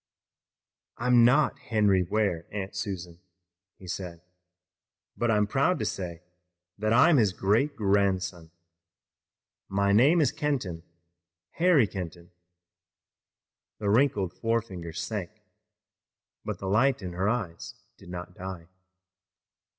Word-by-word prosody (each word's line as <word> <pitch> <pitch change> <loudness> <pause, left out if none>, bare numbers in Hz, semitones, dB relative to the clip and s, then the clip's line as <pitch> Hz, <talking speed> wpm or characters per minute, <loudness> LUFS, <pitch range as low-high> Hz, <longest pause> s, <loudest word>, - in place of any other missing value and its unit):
"I'm 125 -1 +4
not 135 +5 +3
Henry 105 -4 +2
Ware, 90 -3 -1
Aunt 100 -1 -5
Susan," 90 -5 -5 0.6
he 95 - -14
said, 90 -2 -6 0.9
"but 120 - 0
I'm 105 -2 +3
proud 140 - +1
to - - -2
say 90 -3 -5 0.6
that 110 +1 0
I'm 145 +7 +6
his 105 -6 +3
great 110 +11 +1
grandson. 95 -4 0 1.2
My 100 +1 +1
name 135 +12 +5
is 145 -5 +3
Kenton, 140 - -2 0.7
Harry 165 -7 +4
Kenton." 85 -3 -7 1.5
The 100 -2 -1
wrinkled 105 -7 +2
forefinger 110 -7 -2
sank, 95 +1 -5 1.0
but - - -4
the - - -8
light 110 +3 +2
in 90 -1 -5
her 95 +4 0
eyes 105 -8 -4 0.2
did - - -15
not 90 0 -7
die. 90 -2 -8
100 Hz, 110 wpm, -27 LUFS, 90-120 Hz, 1.5 s, I'm